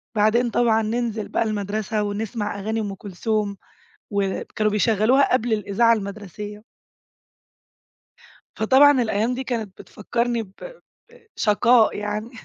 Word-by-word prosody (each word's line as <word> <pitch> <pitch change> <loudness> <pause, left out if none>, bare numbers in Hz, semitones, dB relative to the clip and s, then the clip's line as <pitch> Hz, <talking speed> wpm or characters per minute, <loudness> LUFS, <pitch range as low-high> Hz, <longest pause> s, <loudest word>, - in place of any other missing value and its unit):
بعدين 225 +3 +3
طبعًا 225 -1 +2
ننزل 225 -1 -2
بقى - - 0
المدرسة 210 0 -2
ونسمع 205 0 -3
أغاني 220 +3 -2
أم 205 -2 -3
كلثوم 205 +1 -3 0.5
وب 200 -2 -1
كانوا 215 -1 +2
بيشغّلوها 225 +6 +3
قبل 240 -2 +1
الإذاعة 215 +2 +2
المدرسية. 210 0 -5 1.9
فطبعًا 265 +4 +5
الأيام 220 +2 0
دي 260 +1 -4
كانت 220 -7 -4
بتفكّرني 235 +2 -2
ب 190 - -16 0.6
ب 475 -1 -21
شقاء 225 +2 +3
يعني 210 +2 -4
215 Hz, 115 wpm, -23 LUFS, 205-235 Hz, 1.9 s, فطبعًا